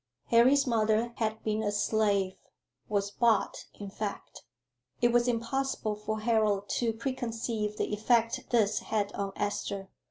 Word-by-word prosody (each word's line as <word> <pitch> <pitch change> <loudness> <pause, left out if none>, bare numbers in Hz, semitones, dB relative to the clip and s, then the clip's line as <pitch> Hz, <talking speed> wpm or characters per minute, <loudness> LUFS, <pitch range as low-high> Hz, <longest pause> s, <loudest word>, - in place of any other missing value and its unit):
"Harry's 255 +5 +5
mother 225 -1 +1
had 220 -1 -2
been 215 0 0
a 205 -1 0
slave 205 -2 +1 0.6
was 200 -1 0
bought, 230 -1 +1
in 205 - -6
fact." 205 0 -5 0.6
It 240 0 +3
was 240 +1 +3
impossible 245 -1 -1
for 215 +1 -4
Harold 215 -3 +2
to 235 -2 +1
preconceive 230 -3 -3
the - - -1
effect 230 +3 +1
this 215 -4 +2
had 205 -2 -1
on 200 -1 -3
Esther. 200 -1 -3
220 Hz, 135 wpm, -30 LUFS, 205-235 Hz, 0.6 s, Harry's